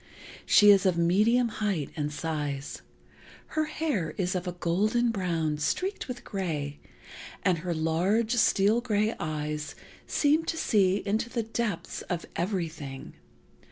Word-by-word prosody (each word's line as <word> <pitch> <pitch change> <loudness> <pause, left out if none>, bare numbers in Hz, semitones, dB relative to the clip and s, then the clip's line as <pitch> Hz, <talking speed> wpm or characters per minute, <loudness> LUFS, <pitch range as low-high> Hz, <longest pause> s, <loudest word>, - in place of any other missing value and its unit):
She 205 -1 +8
is 195 -1 +5
of 180 -2 +2
medium 210 +9 +3
height 200 -9 -2
and 150 -1 -2
size. 150 -3 -4 0.7
Her 310 0 0
hair 295 - -2
is 180 -2 0
of 180 0 -3
a - - -1
golden 210 +8 +1
brown, 165 -7 -1
streaked 375 - -1
with 250 - -6
gray, 150 -7 -3 0.6
and 180 -3 +2
her 170 0 -3
large, 180 +9 +1
steel 215 +1 +4
gray 215 -2 +1
eyes 150 -1 -3 0.3
seem 300 +2 +2
to 325 - -2
see 200 - +2
into 215 +3 0
the 235 -2 -2
depths 215 -6 -3
of 175 -2 -2
everything. 165 -7 -4
185 Hz, 135 wpm, -28 LUFS, 160-220 Hz, 0.7 s, She